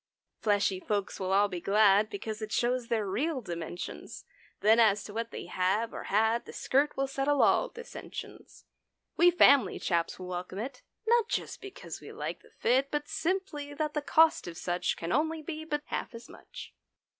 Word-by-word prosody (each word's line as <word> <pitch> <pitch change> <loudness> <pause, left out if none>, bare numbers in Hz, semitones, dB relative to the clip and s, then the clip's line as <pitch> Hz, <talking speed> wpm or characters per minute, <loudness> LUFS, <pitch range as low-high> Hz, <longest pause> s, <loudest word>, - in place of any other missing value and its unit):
Fleshy 205 -3 +1
folks 200 0 -2
will 190 -1 -2
all 200 +1 +4
be 180 -3 -5
glad 205 +1 +4
Because 215 +1 -5
it 215 0 -5
shows 245 +1 0
their 220 -3 0
real 265 +10 -1
dimensions. 175 -5 -7 0.4
Then, 220 +2 +5
as 210 -3 +4
to 205 - -9
what 230 +1 -3
they - - -7
have 190 +6 0
or - - -6
had, 220 +3 +2
The - - -10
skirt 285 +3 +1
will 275 - +1
settle 275 +1 +1
all - - +3
dissensions. 475 0 -10 0.5
We 350 +1 +6
family 280 - +5
chaps 170 -1 -1
will 185 - -8
welcome 180 +1 -5
it— 250 +4 -5 0.2
(Not 465 0 +3
just - - -3
because 395 -1 -8
we - - -10
like - - -5
the - - -20
fit). 265 +3 +1
But 295 0 -2
simply 320 -6 -2
that 305 0 -2
the 295 - -1
cost 320 - +4
of 170 -1 -7
such 175 0 -1
Can 165 +1 -4
only 315 +1 0
be 315 0 -6
but 295 -2 -2
half - - -4
as 230 - -10
much. - - -11
230 Hz, 185 wpm, -30 LUFS, 200-295 Hz, 0.5 s, We